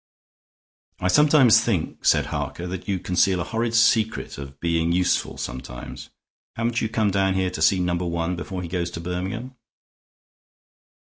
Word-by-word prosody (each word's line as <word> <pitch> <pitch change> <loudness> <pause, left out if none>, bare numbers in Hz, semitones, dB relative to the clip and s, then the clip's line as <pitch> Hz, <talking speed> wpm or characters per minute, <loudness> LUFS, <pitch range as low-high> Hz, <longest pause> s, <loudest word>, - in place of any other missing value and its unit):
"I 90 - 0
sometimes 140 -3 +6
think," 100 -10 -2
said - - +4
Harker, 85 - -4
"that 90 +2 -6
you 100 -2 0
conceal 90 +1 +1
a - - -1
horrid 115 +4 -2
secret 110 -6 +2
of 70 0 -9
being 85 0 0
useful 90 +1 0
sometimes. 60 -1 -7 0.5
Haven't 115 +1 -1
you 110 - -1
come 110 -2 +1
down 95 0 +1
here 95 -1 0
to 80 - -6
see 85 +5 +4
Number 90 0 -1
One 85 +1 -2
before 90 +1 -5
he - - -5
goes 85 0 -2
on - - -17
to 85 - -5
Birmingham?" 95 +9 -4
90 Hz, 165 wpm, -23 LUFS, 85-110 Hz, 0.5 s, sometimes